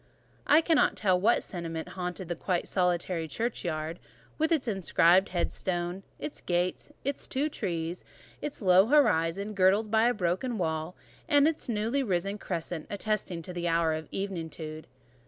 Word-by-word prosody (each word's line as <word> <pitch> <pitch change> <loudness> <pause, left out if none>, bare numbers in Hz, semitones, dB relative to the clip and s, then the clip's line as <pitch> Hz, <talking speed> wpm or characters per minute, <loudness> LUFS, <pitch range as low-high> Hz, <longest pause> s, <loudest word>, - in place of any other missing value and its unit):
I 305 +2 +7
cannot 325 -2 +3
tell 185 -4 +2
what 230 +4 +3
sentiment 165 -3 -5
haunted 180 0 -5
the 175 - -2
quite 175 +1 -1
solitary 175 -2 0
churchyard, 170 -6 -3 0.4
with 315 +2 +2
its 305 -6 +2
inscribed 190 -2 +4
headstone; 175 0 -2 0.2
its 300 - -5
gate, 180 +6 -1
its 280 +1 -3
two 285 +4 0
trees, 170 - -3 0.4
its 290 -6 -5
low 185 +2 +6
horizon, 205 - +3
girdled 200 +3 +3
by 225 +1 +4
a 245 - +3
broken 190 +6 -1
wall, 160 -1 -2 0.3
and 290 0 +5
its 320 -5 -2
newly 230 +5 0
risen 195 -2 -1
crescent, 170 -3 -4
attesting 200 -5 -2
the 175 0 -4
hour 165 -1 +2
of 155 -1 -5
eventide. 160 -5 -5
185 Hz, 145 wpm, -29 LUFS, 170-220 Hz, 0.4 s, I